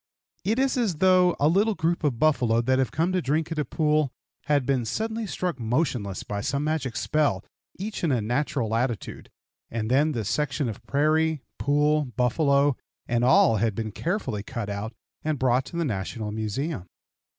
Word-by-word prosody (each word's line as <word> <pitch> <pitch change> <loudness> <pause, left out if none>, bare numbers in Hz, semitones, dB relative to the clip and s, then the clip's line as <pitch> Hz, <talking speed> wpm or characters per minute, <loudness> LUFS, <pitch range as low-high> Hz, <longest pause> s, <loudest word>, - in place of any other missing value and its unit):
It 220 +4 +1
is 270 0 +1
as 220 -8 +1
though 180 +1 +4
a 145 - +4
little 200 +6 +3
group 170 0 0
of 140 -6 +1
buffalo 120 -6 +3
that 130 +2 +2
have 130 - +1
come 165 +5 0
to 185 -1 +1
drink 155 +4 -1
at 160 - -2
a - - +2
pool 150 -3 +1 0.3
had 145 -3 +2
been 130 -2 +1
suddenly 220 - -2
struck 180 -6 -3
motionless 120 - -1
by 100 -1 -4
some 140 +6 -1
magic 150 -6 -1
spell, 155 -2 0 0.3
each 205 +1 -5
in 165 - +2
a 125 - +2
natural 120 0 -1
attitude, 115 -3 -2 0.4
and 115 0 -3
then 150 +4 +3
the 115 -5 -3
section 145 +3 -1
of 110 -2 -6
prairie, 155 +1 +2 0.2
pool, 150 +1 +2
buffalo, 140 +2 +3 0.3
and 120 0 +1
all 120 -3 +5
had 110 0 0
been 110 0 -3
carefully 165 - -2
cut 110 -1 -5
out 100 +2 -4 0.3
and 155 -1 0
brought 130 0 +2
to - - -10
the 170 - 0
National 105 -1 -3
Museum. 110 - -3
140 Hz, 180 wpm, -26 LUFS, 115-160 Hz, 0.4 s, all